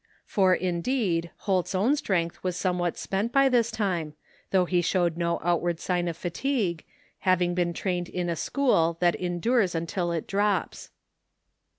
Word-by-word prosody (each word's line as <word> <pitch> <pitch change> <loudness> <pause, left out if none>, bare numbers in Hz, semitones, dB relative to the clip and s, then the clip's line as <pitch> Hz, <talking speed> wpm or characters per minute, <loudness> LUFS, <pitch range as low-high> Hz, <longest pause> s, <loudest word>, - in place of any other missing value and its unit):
For, 190 -2 +3
indeed, 175 -1 -1 0.2
Holt's 190 -1 0
own 225 +10 +3
strength 175 - -1
was 180 -1 -2
somewhat 180 -2 -1
spent 200 +4 -2
by 275 0 +4
this 235 -3 +3
time, 175 -9 -2 0.3
though 185 -2 +3
he 175 0 +1
showed 175 -1 +1
no 170 0 -1
outward 175 0 0
sign 175 -1 -1
of 165 -1 -3
fatigue, 180 - -1 0.4
having 180 -1 +2
been 175 -1 0
trained 175 0 -2
in 180 -1 -3
a 170 - -1
school 170 - +1
that 175 -1 +3
endures 180 +3 0
tmtil 170 +1 -1
it 160 - -5
drops. 200 -2 -1
180 Hz, 155 wpm, -27 LUFS, 170-200 Hz, 0.4 s, by